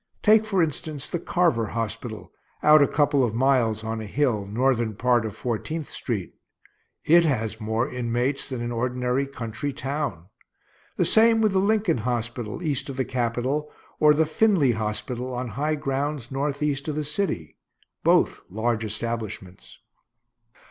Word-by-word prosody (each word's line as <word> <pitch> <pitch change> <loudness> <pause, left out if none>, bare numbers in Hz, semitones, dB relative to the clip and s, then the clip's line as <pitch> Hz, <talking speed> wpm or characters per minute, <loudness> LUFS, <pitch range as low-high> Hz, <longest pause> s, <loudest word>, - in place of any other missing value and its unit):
Take, 220 0 +5
for 195 -5 +2
instance, 150 -1 -4
the 175 - -3
Carver 165 -11 +1
hospital, 115 0 -4 0.3
out 150 0 +7
a 140 - +5
couple 145 -2 +2
of 115 -3 -1
miles, 120 -4 +2
on 110 0 -3
a 110 - -6
hill, 115 -5 0
northern 120 0 +1
part 120 0 +2
of 110 -2 -5
Fourteenth 135 +8 -4
street. 105 -8 -4 0.7
It 170 +2 +6
has 115 -7 -1
more 110 +3 0
inmates 125 +1 -1
than 130 -3 -4
an 120 - -3
ordinary 125 +2 -1
country 135 +2 -4
town. 135 - -3 0.7
The - - +2
same 225 0 +5
with 215 -2 +3
the 190 - +2
Lincoln 200 - +2
hospital, 120 +3 -3
east 145 -4 -1
of 135 - -6
the 130 - 0
Capitol, 130 +5 -1 0.3
or 150 -1 +6
the 160 +1 +3
Finley 160 - +3
hospital, 120 +3 -3
on 125 0 -3
high 150 +6 -1
grounds 140 -2 -3
northeast 140 +1 -1
of 150 - -2
the 155 - -1
city; 150 - -3 0.5
both - - +3
large 110 +3 -1
establishments. 110 -4 -5
130 Hz, 150 wpm, -25 LUFS, 115-150 Hz, 0.7 s, out